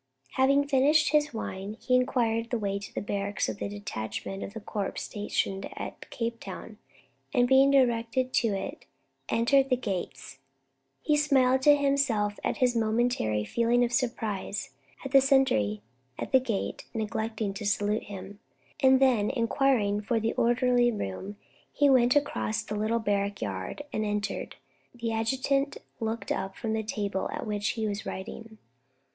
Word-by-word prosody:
Having 275 +2 +3
finished 290 +2 +4
his 300 -1 +3
wine, 210 -2 -5
he 255 - -1
inquired 235 -3 +2
the 240 - 0
way 200 -2 -2
to 200 - -9
the - - -4
barracks 200 0 -2
of 110 -2 -5
the 100 - -3
detachment 110 - -5
of 200 - -7
the - - -4
corps 205 -1 -4
stationed 195 -2 -2
at - - -7
Cape 230 0 -3
Town, - - -9 0.6
and 245 -1 +4
being 265 +2 +6
directed 255 -1 +2
to 235 - +3
it, 195 -3 -4 0.4
entered 270 +4 +3
the 255 - +3
gates. 185 - -5 0.6
He 300 - +3
smiled 265 -3 +3
to 290 +2 +7
himself 275 -8 +1
at - - -1
his 250 -2 +2
momentary 220 - +1
feeling 235 - +2
of 240 0 -1
surprise 220 - -2 0.3
at 270 - -4
the 270 0 +7
sentry 185 - +2 0.3
at - - -5
the 260 - +6
gate 230 -6 -3
neglecting 220 -1 -2
to 200 - -7
salute 205 +1 0
him, 200 0 -9 0.4
and 265 -2 +5
then 245 -6 +3
inquiring 230 -4 +1
for 225 +2 0
the 225 +1 -1
orderly 240 0 +3
room, 200 - -5 0.3
he 285 -1 +3
went 250 0 +5
across 230 -6 0
the 215 - -6
little 215 +2 0
barrack 205 -2 -1
yard 95 - -4
and 215 - 0
entered. 210 -1 -3 0.4
The 235 -1 -3
adjutant 265 +5 0 0.2
looked 225 0 -3
up 190 0 -2
from 225 -2 -3
the 220 - 0
table 205 -3 -2
at - - -4
which 210 -1 -1
he 220 -2 -2
was 205 0 -3
writing. 220 +3 -7
225 Hz, 160 wpm, -28 LUFS, 205-260 Hz, 0.6 s, to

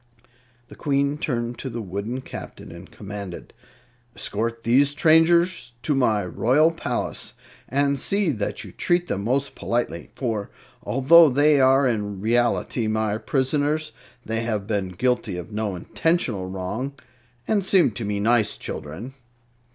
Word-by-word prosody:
The - - -12
Queen 140 +1 0
turned 120 -4 -2
to 135 - -4
the 120 -1 -5
wooden 105 +5 -4
Captain - - -9
and - - -11
commanded: 100 -3 -8 0.6
"Escort 115 +2 -3
these 135 +5 +4
strangers 165 0 +3
to 145 - +1
my 110 -7 +2
royal 130 - +3
palace, 165 - -3 0.4
and 140 +1 +1
see 200 0 +1
that 110 -6 -3
you - - -10
treat 175 0 +1
them 100 - -2
most 135 +5 0
politely; 115 -9 -3
for 110 -6 -3 0.3
although 140 +9 +6
they 145 +2 +4
are 135 +1 +5
in 105 -5 -1
reality 120 +1 +1
my 110 -1 0
prisoners, 150 +4 0 0.3
they 115 +1 -1
have 110 -3 -2
been 100 -3 -1
guilty 115 0 -1
of 90 +5 -8
no 105 -2 -2
intentional 110 - -1
wrong 100 +9 -4 0.5
and 210 -3 +1
seem 185 -7 +4
to 110 +3 -5
be 105 -1 -2
nice 110 0 +2
children." 95 - -7
120 Hz, 140 wpm, -23 LUFS, 105-140 Hz, 0.6 s, although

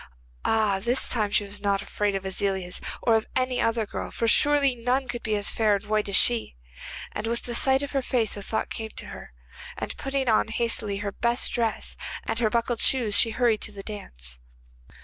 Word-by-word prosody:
Ah, 215 -3 +2
this 240 +6 +2
time 215 -4 +1
she 205 - +1
was 205 0 -7
not 200 -1 +1
afraid 205 -1 -1
of 195 0 -4
Aziliez 190 -1 -2 0.2
or 230 - +4
of 220 -1 +2
any 255 -1 +1
other 230 -1 +1
girl, - - -5
for 230 - -2
surely 285 +2 +5
none 250 +3 0
could 240 -1 -4
be 215 -1 -1
as 205 0 +2
fair 215 -2 +2
and 200 - -5
white 215 0 0
as 195 - +1
she. 110 - +4 0.6
And 210 +2 -4
with 235 +1 -2
the 240 - -4
sight 265 +3 +4
of 285 - -5
her 275 - 0
face 240 -4 0
a 205 - -6
thought 220 +2 -3
came 220 -1 -5
to - - -6
her, - - -10 0.5
and - - -4
putting 270 -1 -2
on 220 -1 +3
hastily 220 -3 0
her 200 - -1
best 235 +4 0
dress 230 -2 -2 0.3
and 225 - -2
her 225 -3 +2
buckled 235 +1 0
shoes 240 -6 +2
she 225 +3 +5
hurried 230 -1 +1
off - - -2
to - - -8
the 200 -1 -8
dance. - - -6
220 Hz, 215 wpm, -26 LUFS, 205-240 Hz, 0.6 s, surely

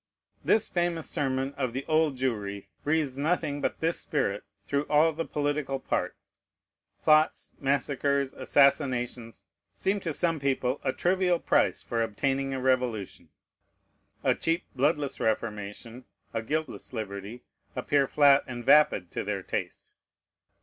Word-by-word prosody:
This 220 - +3
famous 175 -2 -1
sermon 135 -1 -1
of 130 -4 -1
the 130 +2 -4
Old 155 -3 +2
Jewry 105 -6 -2 0.2
breathes 145 -3 0
nothing 150 -2 0
but - - -2
this 165 +1 +1
spirit 115 -9 -1 0.2
through 140 +1 0
all 155 +2 +4
the 165 +2 -3
political 145 -2 -1
part. - - -2 0.9
Plots, 155 0 +3
massacres, 140 0 0
assassinations, 125 -4 +1 0.3
seem 200 +2 0
to 170 -4 -3
some 165 +2 0
people 135 -1 0
a - - +1
trivial 180 +3 +1
price - - +1
for 115 -1 -2
obtaining 135 +5 -1
a 135 - -2
revolution. 125 -6 -1 0.9
A - - +4
cheap, 165 +2 -1
bloodless 145 +1 0
reformation, 110 +2 -3 0.3
a 115 - -1
guiltless 155 +3 -4
liberty, 105 +1 -6 0.3
appear 135 +2 +1
flat 140 -1 +5
and 120 -2 -6
vapid 125 - +4
to - - -3
their 100 -2 -3
taste. - - -5
135 Hz, 130 wpm, -28 LUFS, 120-150 Hz, 0.9 s, flat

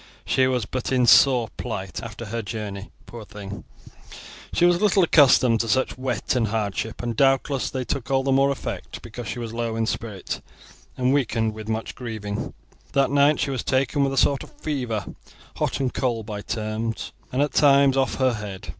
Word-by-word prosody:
She 130 0 +3
was 125 -4 0
but 130 +2 -4
in 125 -2 +3
poor 125 -1 +6
plight 95 -6 -5
after 115 0 -7
her 115 +2 -3
journey; 105 -2 -6 0.2
poor 115 -2 -9
thing, 100 -3 -9 0.9
she 175 - +3
was 175 0 +3
little 200 -2 +4
accustomed 130 -7 +5
to 115 - 0
such 130 +4 +1
wet 130 -2 -2
and 120 -3 +2
hardship, 105 +1 -3
and 120 -1 -2
doubtless 135 +1 +2
they 130 -1 -3
took 135 +1 -3
all 135 -1 +2
the 135 - 0
more 135 +1 +4
effect 140 - -5
because 115 0 -8
she - - -4
was 115 -2 -5
low 115 -1 -2
in 115 0 0
spirit 110 -4 -4 0.6
and 130 +1 +2
weakened 115 -5 +1
with 110 0 -8
much 110 0 -3
grieving. 110 -5 -5 0.4
That 140 -1 +2
night 145 +1 +4
she 140 - 0
was 130 -4 -2
taken 135 +2 +1
with 135 0 0
a - - -4
sort 140 +1 +3
of - - -11
fever, 125 - -2 0.5
hot - - -1
and 130 -2 -1
cold 120 -4 -1
by 105 -1 -5
turns, 110 +1 -3 0.2
and 130 - -2
at 145 - -2
times 140 -2 +5
off 135 -1 +1
her 130 -2 +2
head. 105 -3 -7
120 Hz, 190 wpm, -24 LUFS, 110-135 Hz, 0.9 s, poor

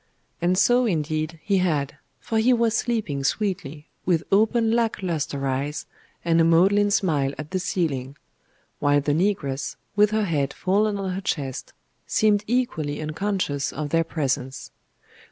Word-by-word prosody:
And 180 +2 +2
so, 245 +4 +4
indeed, 155 -2 -2
he 200 -2 +2
had; 150 -6 0 0.2
for 220 - -1
he 245 +3 +4
was 230 -1 +2
sleeping 215 - -1
sweetly, 155 -4 -2 0.2
with 170 -3 +1
open 220 +3 +3
lack 230 -3 0
lustre 150 -5 -2
eyes, 135 +3 -2 0.4
and 165 -1 +4
a - - +5
maudlin 190 +5 +4
smile 150 -9 +1
at 155 0 -7
the 185 - 0
ceiling; 145 -7 -2 0.6
while 145 0 +3
the 145 +1 0
negress, 145 -6 -1 0.2
with 210 0 +5
her 215 0 +1
head 145 -6 -1
fallen 205 +2 +1
on 195 -1 -3
her 190 +2 -3
chest, 140 -8 -3 0.3
seemed 210 -1 +2
equally 185 -12 -1
unconscious 155 -2 -2
of 150 -1 -4
their 165 0 +3
presence. 135 -5 -3
170 Hz, 150 wpm, -24 LUFS, 145-205 Hz, 0.6 s, a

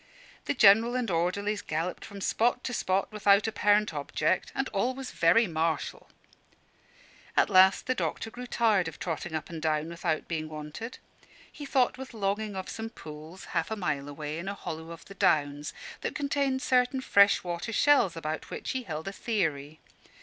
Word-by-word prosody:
The - - -1
General 225 +2 +6
and 245 -5 -1
orderlies 200 +5 0
galloped 165 +4 -3
from 200 -1 -9
spot 240 +5 +1
to 250 - -3
spot 190 -2 0
without 205 -1 +4
apparent 210 -2 +2
object; 150 +4 -1
and 270 - 0
all 240 +6 0
was 270 -1 -6
very 175 +8 +4
martial. 165 -2 -2 1.3
At - - +4
last 190 0 +6
the 255 - +1
doctor 225 -2 -3
grew 250 +2 -8
tired 215 -8 +2
of 165 - -7
trotting 165 -1 -4
up 155 +2 -4
and 165 -2 -6
down 155 0 0
without 170 -2 -2
being 155 -2 -3
wanted. 155 +10 -7 0.5
He 290 - -8
thought 255 -1 +2
with 265 -2 -8
longing 205 0 -1
of 190 0 -4
some 225 0 -5
pools, 155 -1 -10
half - - 0
a 220 - -2
mile 145 -8 -2
away, 150 +2 -5
in 180 - -6
a 200 - -3
hollow 160 -3 -6
of 170 0 -10
the 195 - -11
Downs, 145 -5 +1 0.3
that - - -3
contained 280 -2 0
certain 255 0 +2
freshwater 200 -3 +3
shells 230 -7 +4
about 155 -1 -4
which - - -4
he 260 - -2
held 160 -6 -6
a 195 - -4
theory. 155 -9 -2
195 Hz, 175 wpm, -29 LUFS, 160-230 Hz, 1.3 s, General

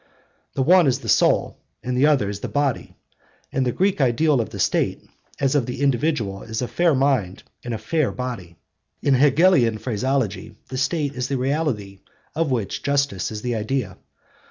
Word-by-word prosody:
The 135 - +1
one 175 +2 +5
is 130 - +1
the - - -8
soul - - +2 0.2
and 125 0 -2
the 135 +4 +4
other 140 -9 +2
is 100 0 -4
the - - -4
body, 145 -3 -2 0.6
and 130 -1 0
the - - +1
Greek 190 +2 +1
ideal 135 +2 +3
of 110 - -5
the - - -8
State, - - 0 0.4
as 135 0 +1
of 140 -5 +1
the 125 - -5
individual, 125 -7 0
is 110 -1 -5
a - - -2
fair 170 0 +2
mind 130 -9 0 0.2
in 120 - -6
a 115 - -2
fair 145 +7 0
body. 120 -9 -6 0.5
In 140 - +3
Hegelian 140 -3 +4
phraseology 115 -2 -2
the 130 - -5
state 145 0 -1
is 125 -1 -3
the 140 - -1
reality 125 -8 -2 0.3
of 160 -1 0
which 115 -7 -2
justice 140 -10 0
is 105 -1 -6
the 125 -1 -1
idea. 110 -3 -2
130 Hz, 180 wpm, -22 LUFS, 110-145 Hz, 0.6 s, one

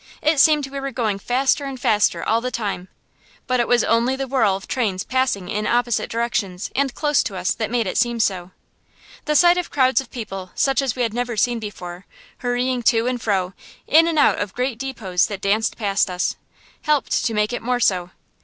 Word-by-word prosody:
It 310 -1 +3
seemed 300 -1 +5
we 275 +1 -6
were 275 0 -3
going 220 -6 -2
faster 265 +6 +1
and 270 -2 -6
faster 210 -3 +2
all 225 +1 +1
the 250 - -2
time, 205 -6 -4 0.6
but 255 -1 0
it 240 - +1
was 240 -2 +3
only 235 +3 +2
the 270 0 -3
whirl 230 -7 +2
of 195 - -8
trains 205 -8 -1
passing 255 -8 -1
in 210 +1 -2
opposite 240 -1 +1
directions 225 -5 -2
and 275 0 +1
close 295 -2 +2
to 200 - -4
us 180 - 0
that 220 - -3
made 235 -1 0
it 185 - -1
seem 240 -1 +1
so. 185 -4 0 0.8
The 300 - 0
sight 350 +3 +5
of 355 - -4
crowds 260 -1 +3
of 260 - -13
people 195 -6 -7
such 270 0 +2
as 270 -4 -1
we 250 - -1
had 225 -2 -1
never 240 -1 -3
seen 240 +3 +1
before, 185 -4 -8 0.3
hurrying 245 0 -1
to 230 0 +3
and 250 -1 -2
fro, 190 -3 0 0.3
in 325 +2 +5
and 330 -2 -1
out 290 - +4
of 205 -2 -4
great 250 -2 -2
depots 225 -10 -1
that 200 -2 -6
danced 205 +3 0
past 200 -3 +1
us, 180 0 -1 0.5
helped 300 -3 +1
to 225 - -1
make 210 +2 0
it - - -3
more 245 +1 -1
so. 180 -6 +1
235 Hz, 210 wpm, -21 LUFS, 205-260 Hz, 0.8 s, seemed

